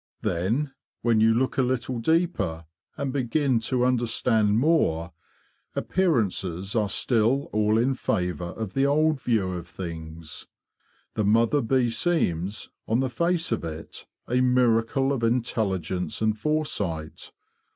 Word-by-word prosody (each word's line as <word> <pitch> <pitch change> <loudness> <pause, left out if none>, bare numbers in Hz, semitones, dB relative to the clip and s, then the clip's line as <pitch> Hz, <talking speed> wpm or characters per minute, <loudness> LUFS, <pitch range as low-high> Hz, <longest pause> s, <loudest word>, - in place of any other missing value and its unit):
Then, 115 - 0 0.3
when 115 -2 +3
you 110 +1 +5
look 130 +4 +1
a - - +6
little 125 -1 -1
deeper 160 - 0 0.3
and 140 -2 -2
begin 135 -1 +1
to 125 +2 0
under 125 -2 +1
stand 110 -2 +2
more, 90 - +2 0.6
appearances 100 - 0
are 105 -3 +1
still 120 +6 +1
all 105 0 +2
in 125 +4 +2
favour 90 - -1
of 105 +3 -5
the 135 +1 +2
old 155 0 +2
view 100 -6 0
of 85 -1 -6
things. 80 -3 -7 0.7
The 110 - 0
mother 115 +6 +3
bee 125 0 +1
seems, 110 - -1 0.2
on 115 +2 +2
the 130 -1 0
face 170 +5 0
of - - -1
it, 80 -1 -8 0.2
a 125 +1 +2
miracle 125 +1 +2
of 130 - -2
intelligence 100 -7 -1
and 110 -1 +1
foresight. 105 - -2
115 Hz, 135 wpm, -26 LUFS, 95-130 Hz, 0.7 s, a